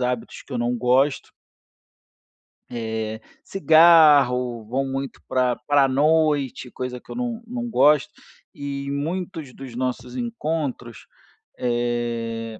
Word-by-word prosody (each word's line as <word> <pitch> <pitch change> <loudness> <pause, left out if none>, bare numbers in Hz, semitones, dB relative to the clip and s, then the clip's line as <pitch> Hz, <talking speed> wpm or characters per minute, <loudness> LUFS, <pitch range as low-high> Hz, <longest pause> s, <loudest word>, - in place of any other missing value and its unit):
hábitos 125 -2 -3
que - - -11
eu 125 - -2
não 120 +1 0
gosto 130 +4 +1 1.4
Eh, 110 -2 -4 0.2
cigarro, 150 - +5
vão 130 +5 -2
muito 135 0 -5
pra 125 -1 +1
pra 145 -2 +4
noite, 145 -2 +1
coisa 125 -1 -5
que - - -15
eu - - -6
não 240 -2 -3
não 240 0 -5
gosto. 150 - +3 0.4
E 140 -1 -5
muitos 160 -1 -4
dos 130 -3 -10
nossos 130 - -4
encontros, 155 - -4 0.5
eh, 120 -2 -2
135 Hz, 115 wpm, -23 LUFS, 120-155 Hz, 1.4 s, cigarro